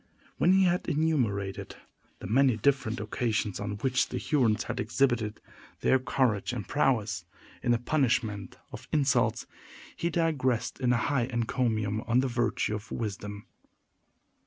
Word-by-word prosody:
When 180 - +5
he 190 0 +5
had 180 -1 +1
enumerated 120 -11 -1 0.4
the - - -10
many 125 +3 +3
different 120 -1 +1
occasions 110 -1 -1
on 100 0 -3
which 125 +5 0
the - - -3
Hurons 120 -8 +1
had - - -4
exhibited 120 -2 0 0.4
their 130 - +4
courage 125 -4 0
and 110 -5 -5
prowess, 110 - +1 0.4
in 120 - +1
the 120 - +4
punishment 115 -7 0
of - - -9
insults, 145 -3 +2 0.5
he 170 - -1
digressed 145 -9 0
in 125 -2 +2
a 125 - +3
high 125 0 +1
encomium 115 -3 -1
on 120 +1 +3
the 135 - 0
virtue 120 -3 0
of 105 +1 -6
wisdom. 105 -1 -5
120 Hz, 140 wpm, -29 LUFS, 105-135 Hz, 0.5 s, When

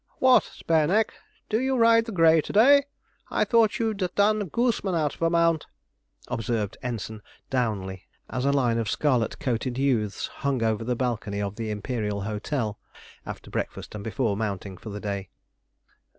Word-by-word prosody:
'What, 260 -1 +6
Spareneck, 165 +7 +1 0.3
do 220 - +1
you 265 +1 +1
ride 230 -1 +5
the 230 - -6
grey 165 -4 +5
to - - -7
day? 280 +6 +6 0.4
I - - +1
thought 230 -3 +3
you'd 220 -2 -1 0.2
done 205 -1 +2
Gooseman 225 - 0
out 150 -3 +1
of - - -15
a 165 - +3
mount,' 165 -2 +2 0.6
observed 115 -3 -2
Ensign 110 -3 -5 0.3
Downley, 100 -7 -2 0.2
as 125 - -3
a 140 - +3
line 125 -5 +2
of 110 -2 -2
scarlet 125 -6 +1
coated 125 -2 -2
youths 115 -7 0 0.2
hung 135 -4 0
over 110 -1 0
the 125 +2 -1
balcony 115 -5 -2
of 100 0 -3
the 115 -1 -4
Imperial 105 -1 -2
Hotel, 105 +2 -3 0.5
after - - -8
breakfast - - -4
and 105 -1 -6
before 110 -1 -1
mounting 100 -2 -3
for 110 - -10
the 105 0 -5
day. 100 -2 -4
125 Hz, 165 wpm, -26 LUFS, 105-170 Hz, 0.6 s, What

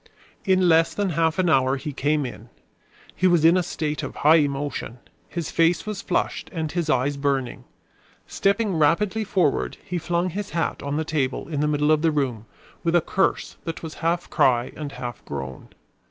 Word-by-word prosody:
In 185 -1 +3
less 165 0 +4
than 205 -2 0
half 165 -1 +1
an 185 -1 +2
hour 135 -4 +3
he 145 +2 -6
came 145 +1 0
in. 125 - -9 0.7
He 185 - +3
was 170 -3 +4
in 165 +2 +7
a 185 - +3
state 150 -4 -3
of - - -6
high 155 +3 +5
emotion. 140 -5 -2 0.3
His 170 -3 -4
face 165 +3 +2
was 210 -2 -4
flushed - - -2
and 160 -4 -3
his 170 -3 -2
eyes 140 +1 +1
burning. 140 -3 -1 0.6
Stepping 200 -1 0
rapidly 190 +8 +2
forward, 180 -8 0
he 180 0 -3
flung 175 +2 -1
his 205 +3 -4
hat 165 - -1
on 140 +1 -2
the 160 - -1
table 140 -4 -1
in 150 -3 -3
the 150 - +2
middle 150 0 +2
of 155 -1 +3
the 165 - +3
room, 130 -8 -2 0.4
with 170 0 +1
a 175 - +5
curse 190 +4 -1
that 165 0 -5
was 160 -1 -6
half 170 +1 0
cry 125 0 +2
and 145 -2 -6
half 120 -4 -6
groan. 65 -2 -6
155 Hz, 190 wpm, -24 LUFS, 140-175 Hz, 0.7 s, in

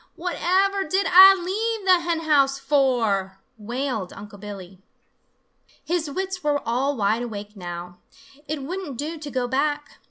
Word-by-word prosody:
Whatever 375 +3 0
did 380 +4 0
Ah 380 +2 +9
leave 425 +4 -2
the 370 -2 +5
hen 335 -1 -2
house 280 -4 +3
for?" 235 -10 +1 0.2
wailed 235 -3 -3
Unc' 205 0 -11
Billy. 195 -3 -9 1.1
His 330 -3 -1
wits 375 +3 -4
were 295 -1 +1
all 265 +4 0
wide 215 +2 +1
awake 210 -3 -7
now. 175 -1 -8 0.5
It 295 -2 -4
wouldn't 335 -3 -5
do 310 +4 -5
to 300 -1 -7
go 255 -2 -2
back. 290 +3 -2
285 Hz, 145 wpm, -23 LUFS, 215-350 Hz, 1.1 s, Ah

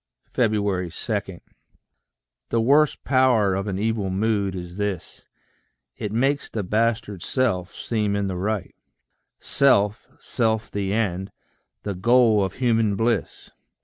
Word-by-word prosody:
2. 100 -6 0 1.6
The 115 - +1
worst 145 +6 +3
power 125 -7 +3
of 95 +2 -2
an 95 -2 -2
evil 105 -1 -1
mood 100 0 0
is 90 0 -7
this 105 -4 -4 0.7
It 105 - -4
makes 135 +6 0
the 110 - -3
bastard 105 -1 0
self 100 -9 -1
seem 105 -3 -1
in 100 0 0
the 95 -1 -3
right, 100 +2 -2 0.7
Self, 105 -6 +2
self 110 -2 -1
the 100 -1 -2
end, 95 -3 -1 0.5
the 100 - -3
goal 110 +2 +4
of 95 - -3
human 115 -5 +1
bliss. 115 +3 -2
105 Hz, 120 wpm, -23 LUFS, 95-115 Hz, 1.6 s, goal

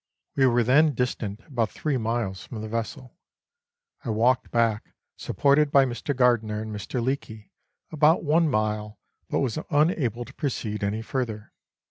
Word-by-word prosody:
We 135 -1 +4
were 120 -1 +3
then 145 +5 +4
distant 115 -4 -2
about 120 -5 -1
three 150 -4 -2
miles 115 -4 -2
from 110 -4 -7
the - - -4
vessel. 115 +3 -5 0.9
I 120 - -5
walked 115 +3 +2
back, 115 -2 0 0.2
supported 145 +1 +2
by 140 -1 +6
Mr. 125 +3 -3
Gardiner 120 -4 +2
and 110 -1 -5
Mr. 115 +4 -3
Leake, 110 -5 -4 0.4
about 155 +1 +3
one 160 +1 +3
mile, 105 -2 -1 0.3
but - - 0
was 130 +1 -1
unable 145 - +1
to 130 - -14
proceed 110 -8 -3
any 105 +3 -1
further. 115 -4 -4
120 Hz, 150 wpm, -25 LUFS, 110-140 Hz, 0.9 s, by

